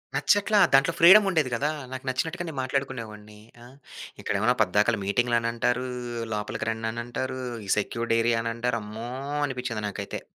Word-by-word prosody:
నచ్చట్లా. 205 Hz, +1 st, +2 dB, 0.2 s
దాంట్లో 140 Hz, +5 st, +5 dB
ఫ్రీడమ్ 190 Hz, +5 st, +9 dB
ఉండేది 160 Hz, -8 st, +1 dB
కదా! 145 Hz, +5 st, 0 dB, 0.2 s
నాకు 130 Hz, 0 st, -6 dB
నచ్చినట్టుగా 160 Hz, +6 st, -2 dB
నేను 150 Hz, -4 st, -7 dB
మాట్లాడుకునేవాడిని. 115 Hz, -6 st, -4 dB, 0.3 s
ఆహ్, 130 Hz, +3 st, -16 dB, 0.4 s
ఇక్కడేమన్నా 110 Hz, +5 st, +1 dB
పద్దాకల, 105 Hz, +4 st, +2 dB
మీటింగ్‌లు 120 Hz, +4 st, +1 dB
అని 115 Hz, 0 st, -1 dB
అంటారు. 125 Hz, +2 st, 0 dB, 0.5 s
లోపలికి 105 Hz, +1 st, -4 dB
రండి 110 Hz, 0 st, -4 dB
అని 120 Hz, +1 st, -4 dB
అంటారు. 130 Hz, +2 st, -4 dB, 0.3 s
ఈ -, -, -8 dB
సెక్యూర్డ్ 115 Hz, +2 st, -2 dB
ఏరియా 115 Hz, 0 st, +2 dB
అని 115 Hz, -, -2 dB
అంటారు, 115 Hz, 0 st, -1 dB
అమ్మో! 110 Hz, +3 st, -7 dB, 0.4 s
అనిపించింది 125 Hz, -5 st, -4 dB
నాకైతే. 100 Hz, 0 st, -5 dB
120 Hz, 155 wpm, -26 LUFS, 110-130 Hz, 0.5 s, ఫ్రీడమ్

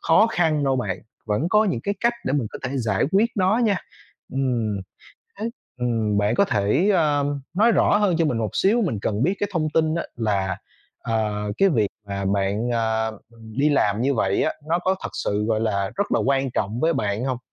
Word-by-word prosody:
khó 190 Hz, +7 st, +5 dB
khăn 160 Hz, -7 st, +1 dB
đâu 135 Hz, -1 st, +2 dB
bạn. 100 Hz, -7 st, -2 dB, 0.3 s
Vẫn 115 Hz, +9 st, 0 dB
có 215 Hz, +3 st, +4 dB
những 155 Hz, -, -1 dB
cái 200 Hz, +10 st, -2 dB
cách 235 Hz, 0 st, +3 dB
để 130 Hz, -, -1 dB
mình 135 Hz, -6 st, 0 dB
có -, -, -7 dB
thể 130 Hz, +1 st, -3 dB
giải 110 Hz, -6 st, +1 dB
quyết 220 Hz, +4 st, +3 dB
nó 190 Hz, +3 st, +3 dB
nha. 205 Hz, -3 st, +2 dB, 0.6 s
Ừm, 120 Hz, -6 st, -1 dB, 0.6 s
thế, 220 Hz, +3 st, -2 dB, 0.3 s
ừm, 110 Hz, -4 st, 0 dB
bạn 105 Hz, +3 st, +2 dB
có 200 Hz, -, +4 dB
thể, 105 Hz, -, +2 dB
ơ, 150 Hz, -6 st, +2 dB, 0.3 s
nói 220 Hz, +5 st, +4 dB
rõ 205 Hz, -, +4 dB
hơn 200 Hz, -5 st, +2 dB
cho 165 Hz, -, +3 dB
mình 130 Hz, -7 st, 0 dB
một 110 Hz, -3 st, -1 dB
xíu, 225 Hz, +5 st, +3 dB
mình 165 Hz, -, -1 dB
cần 105 Hz, +1 st, -1 dB
biết 185 Hz, +8 st, +2 dB
cái 205 Hz, -, -1 dB
thông 155 Hz, -4 st, 0 dB
tin 160 Hz, -1 st, +2 dB
á 170 Hz, -, -1 dB
là, 100 Hz, -5 st, 0 dB, 0.4 s
ờ, 105 Hz, -2 st, -2 dB
cái 195 Hz, -, +5 dB
việc 110 Hz, -, +2 dB, 0.2 s
mà 100 Hz, 0 st, -3 dB
bạn, 100 Hz, +4 st, 0 dB
ờ, 110 Hz, -2 st, -1 dB, 0.2 s
đi 115 Hz, +7 st, 0 dB
làm 105 Hz, -7 st, +2 dB
như 135 Hz, +3 st, +2 dB
vậy 100 Hz, -4 st, +1 dB
á, -, -, +1 dB, 0.2 s
nó 170 Hz, -, +2 dB
có 185 Hz, +2 st, +1 dB
thật -, -, -3 dB
sự, 105 Hz, +1 st, -1 dB
gọi 110 Hz, 0 st, 0 dB
là, 100 Hz, -3 st, 0 dB
rất 200 Hz, -, -1 dB
là -, -, +3 dB
quan 135 Hz, 0 st, +1 dB
trọng 110 Hz, 0 st, -2 dB
với 165 Hz, +1 st, +3 dB
bạn 105 Hz, 0 st, -1 dB
hông? 130 Hz, -2 st, -1 dB
125 Hz, 215 wpm, -23 LUFS, 105-170 Hz, 0.6 s, khó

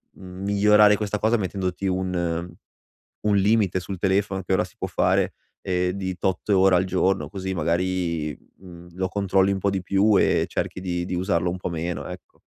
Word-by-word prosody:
migliorare 100 Hz, +3 st, +3 dB
questa 105 Hz, 0 st, -2 dB
cosa 110 Hz, +3 st, +2 dB
mettendoti 95 Hz, -1 st, -3 dB
un 90 Hz, -2 st, -2 dB, 0.7 s
un 105 Hz, -1 st, +2 dB
limite 100 Hz, -2 st, +2 dB
sul 95 Hz, +1 st, -6 dB
telefono, 95 Hz, +1 st, 0 dB
che 95 Hz, +1 st, 0 dB
ora -, -, +2 dB
si -, -, -14 dB
può -, -, -2 dB
fare, -, -, +1 dB, 0.3 s
ehm 90 Hz, -1 st, 0 dB
di 95 Hz, -1 st, -4 dB
tot 95 Hz, +1 st, -2 dB
ore 95 Hz, -2 st, +5 dB
al 90 Hz, -, +2 dB
giorno, 95 Hz, +1 st, 0 dB
così 95 Hz, -1 st, -5 dB
magari, 85 Hz, -2 st, -1 dB, 0.2 s
mhmm, 90 Hz, -2 st, -13 dB
lo 95 Hz, +1 st, -2 dB
controlli 95 Hz, 0 st, +1 dB
un 100 Hz, -, -1 dB
po' 100 Hz, -, 0 dB
di 95 Hz, -2 st, -1 dB
più 100 Hz, +3 st, +3 dB
e -, -, +2 dB
cerchi -, -, -3 dB
di-di 90 Hz, 0 st, -3 dB
usarlo 90 Hz, -1 st, 0 dB
un 90 Hz, -, -5 dB
po' 90 Hz, -, -4 dB
meno. 85 Hz, 0 st, -4 dB
Ecco. -, -, -11 dB
95 Hz, 175 wpm, -24 LUFS, 90-100 Hz, 0.7 s, ore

